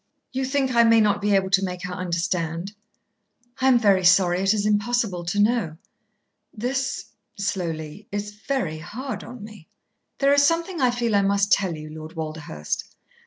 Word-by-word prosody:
"You 265 0 -2
think 265 -1 0
I 235 0 +6
may 230 0 +5
not 205 -2 +2
be 205 0 +2
able 190 -1 +1
to 195 0 +4
make 180 -1 -4
her 180 0 -4
understand?" 170 0 -2 0.9
"I 265 - +2
am 260 -2 +6
very 200 -5 +3
sorry. 180 0 +4
It 195 0 +3
is 210 -1 0
impossible 210 -3 0
to 200 +4 -1
know." 205 -7 +1 0.7
"This," 260 +4 -2 0.3
slowly, 180 -2 -4
"is 205 0 -3
very 210 - -3
hard 255 - -6
on 240 -3 -10
me." 210 -6 -12 0.5
"There 275 0 +3
is 285 - +5
something 335 +2 +1
I 255 - +4
feel 240 -3 0
I 200 - +5
must 200 0 +1
tell 190 -4 +2
you, 155 0 -9
Lord 155 +2 -9
Walderhurst." 155 - -4
Dr. - - -32
200 Hz, 175 wpm, -24 LUFS, 175-240 Hz, 0.9 s, I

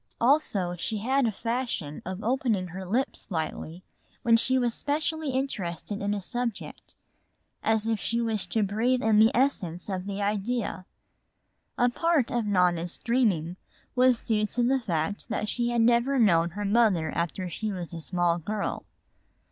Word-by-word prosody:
Also 230 - +2
she 215 +5 -3
had 260 +4 +1
a - - +1
fashion 230 - -3
of 185 +2 -5
opening 225 -6 0
her 185 +2 -7
lips 245 +8 -1
slightly 165 0 -4 0.4
when 230 -1 +5
she 260 +3 +3
was 240 -2 +1
specially 310 +2 -1
interested 205 - -3
in 205 +1 0
a - - -2
subject, 240 +3 -4 0.7
as 220 0 +2
if 225 -2 0
she 230 +5 -1
wished 225 -4 -1
to 220 - +2
breathe 230 +6 +1
in 215 -1 +4
the 220 +1 +7
essence 185 -10 0
of 190 0 -3
the 200 0 -4
idea. 205 -1 -2 0.9
A 245 - +4
part 295 0 +1
of 235 -3 -1
Nona's 180 -3 +1
dreaming 195 -9 0 0.4
was 250 -1 +4
due 215 -2 +1
to 240 +3 -1
the 265 +2 +3
fact 180 -3 -2
that 215 - -2
she 240 +2 +1
had 240 -1 +1
never 240 +4 +3
known 170 -8 +4
her 205 - -2
mother 200 -7 +3
after 175 +3 -2
she 210 +5 -3
was 180 -3 -6
a 165 - -5
small 175 0 0
girl. 205 +5 -3
215 Hz, 165 wpm, -27 LUFS, 185-240 Hz, 0.9 s, the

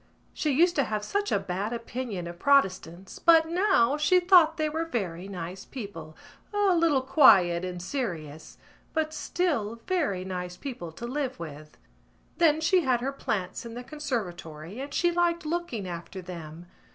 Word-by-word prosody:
She 305 - -1
used 340 +6 +3
to 280 - +3
have 215 -1 -3
such 405 - -1
a - - +3
bad 195 +2 -3
opinion 230 -5 -5
of 170 0 -8
Protestants 190 -9 +1
but 325 -1 +6
now 335 - +3
she 300 +5 +4
thought 350 -3 +5
they 310 -1 +1
were 320 +2 -2
very 195 - -4
nice 185 0 -6
people, 200 -10 -8 0.3
a 410 -2 +3
little 325 -6 +3
quiet 190 - +5
and 180 -1 -4
serious, 170 - -5 0.4
but 315 -1 0
still 290 - -1
very 290 - -1
nice 180 -1 -5
people 235 - -6
to 235 - -7
live 260 +1 -3
with. 150 -2 -9 0.6
Then 315 -3 +4
she 360 +3 +4
had 255 -5 +1
her 270 +2 -2
plants 190 -8 -3
in 235 -1 -8
the 245 - -6
conservatory 200 - -5
and 280 +2 -6
she 345 +3 +2
liked 345 -1 +1
looking 305 - -3
after 175 +2 -7
them. 170 -2 -9
240 Hz, 165 wpm, -27 LUFS, -, 0.6 s, but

